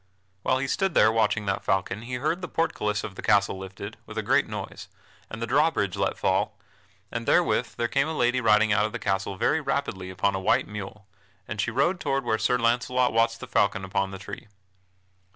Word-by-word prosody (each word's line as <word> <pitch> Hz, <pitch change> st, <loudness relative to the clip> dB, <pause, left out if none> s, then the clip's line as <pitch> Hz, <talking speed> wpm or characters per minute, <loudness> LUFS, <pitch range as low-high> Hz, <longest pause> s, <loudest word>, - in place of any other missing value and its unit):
While 130 Hz, -, +2 dB
he 135 Hz, -, -1 dB
stood 190 Hz, +5 st, 0 dB
there 110 Hz, -, +6 dB
watching 110 Hz, -1 st, +1 dB
that 95 Hz, -1 st, -1 dB
falcon 95 Hz, +2 st, 0 dB
he 125 Hz, +2 st, -5 dB
heard 155 Hz, +8 st, -1 dB
the 180 Hz, -, -4 dB
portcullis 105 Hz, -12 st, -1 dB
of 95 Hz, -, -6 dB
the -, -, -8 dB
castle 100 Hz, -1 st, +2 dB
lifted, 100 Hz, +3 st, -8 dB
with -, -, -9 dB
a -, -, -1 dB
great -, -, +3 dB
noise, -, -, -7 dB, 0.4 s
and 110 Hz, -, -7 dB
the 115 Hz, -, -2 dB
drawbridge 140 Hz, -, +2 dB
let -, -, -1 dB
fall, -, -, 0 dB, 0.5 s
and 115 Hz, -1 st, -4 dB
therewith -, -, +2 dB
there 120 Hz, -, 0 dB
came 135 Hz, +4 st, +1 dB
a 160 Hz, -1 st, -3 dB
lady 125 Hz, +1 st, +2 dB
riding 110 Hz, -1 st, +4 dB
out 105 Hz, 0 st, +3 dB
of 110 Hz, -, -11 dB
the -, -, -2 dB
castle 95 Hz, 0 st, -2 dB
very -, -, +2 dB
rapidly 95 Hz, -1 st, -2 dB
upon 95 Hz, +2 st, 0 dB
a 95 Hz, -, -2 dB
white 95 Hz, -, +2 dB
mule, 105 Hz, 0 st, -8 dB, 0.4 s
and 105 Hz, -, -2 dB
she 115 Hz, -, -1 dB
rode 140 Hz, +10 st, +1 dB
toward 135 Hz, -3 st, -1 dB
where 110 Hz, -2 st, +1 dB
Sir 125 Hz, -, +2 dB
Launcelot 125 Hz, +1 st, +1 dB
watched 115 Hz, 0 st, +2 dB
the -, -, -7 dB
falcon 100 Hz, -1 st, +1 dB
upon 95 Hz, 0 st, -1 dB
the 95 Hz, -, -7 dB
tree. 100 Hz, +1 st, -9 dB
110 Hz, 210 wpm, -26 LUFS, 100-125 Hz, 0.5 s, there